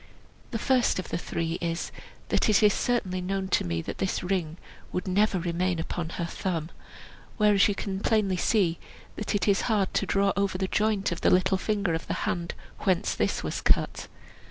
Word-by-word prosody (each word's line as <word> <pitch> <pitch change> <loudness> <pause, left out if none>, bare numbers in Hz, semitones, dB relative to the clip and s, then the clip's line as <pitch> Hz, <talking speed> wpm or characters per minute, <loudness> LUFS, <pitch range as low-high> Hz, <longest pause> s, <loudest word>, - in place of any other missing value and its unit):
The 230 - -2
first 250 +2 +2
of 185 - -4
the - - -1
three 165 -1 -3
is, 170 0 -2 0.4
that - - +2
it 215 +1 +4
is 205 -1 +6
certainly 190 -7 0
known 190 +1 -2
to - - +2
me 85 -1 -2
that - - -6
this 190 - -1
ring 175 -3 -1 0.3
would 180 - -3
never 200 +1 +2
remain 175 +1 0
upon 165 0 -3
her 170 - -3
thumb, 170 -2 -3 0.7
whereas 210 -2 +5
you 205 - 0
can 195 -1 -3
plainly 205 -3 +2
see 180 -4 +2 0.4
that 215 0 -2
it 205 - 0
is 200 -1 +3
hard 205 -4 +1
to 200 - 0
draw 200 0 +2
it - - +1
over 200 -2 +1
the 190 0 -1
joint 210 -1 +1
of 170 - -4
the - - +4
little 185 +1 +3
finger 200 -4 0
of 165 - -3
the - - -1
hand 170 -1 -2 0.2
whence 185 -3 +1
this - - -1
was - - -3
cut. - - +1
190 Hz, 200 wpm, -27 LUFS, 175-205 Hz, 0.7 s, is